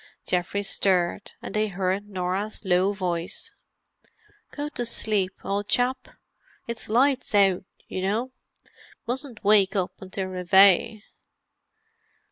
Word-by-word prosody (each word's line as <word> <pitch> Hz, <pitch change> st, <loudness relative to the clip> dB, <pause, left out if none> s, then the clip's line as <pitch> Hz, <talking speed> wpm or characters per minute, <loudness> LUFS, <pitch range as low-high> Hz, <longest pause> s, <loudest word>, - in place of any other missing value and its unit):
Geoffrey 180 Hz, +3 st, -1 dB
stirred, 190 Hz, -1 st, +1 dB
and -, -, -6 dB
they 215 Hz, 0 st, +1 dB
heard 195 Hz, +1 st, -2 dB
Norah's 195 Hz, +3 st, -3 dB
low 185 Hz, +1 st, +3 dB
voice. 180 Hz, -4 st, -4 dB, 1.0 s
"Go 290 Hz, 0 st, -5 dB
to 265 Hz, -5 st, -4 dB
sleep, 215 Hz, -5 st, 0 dB
old 200 Hz, +1 st, -2 dB
chap; 255 Hz, +3 st, +1 dB, 0.6 s
it's 235 Hz, -2 st, -6 dB
'Lights 255 Hz, 0 st, +2 dB
Out,' 195 Hz, -2 st, +3 dB, 0.2 s
you 185 Hz, -, -4 dB
know. 220 Hz, +7 st, -1 dB, 0.3 s
You -, -, -29 dB, 0.3 s
mustn't 250 Hz, -1 st, -3 dB
wake 200 Hz, -1 st, +4 dB
up 185 Hz, -2 st, 0 dB
until 190 Hz, 0 st, -4 dB
Reveille." 190 Hz, +3 st, +4 dB
200 Hz, 115 wpm, -25 LUFS, 185-220 Hz, 1.0 s, wake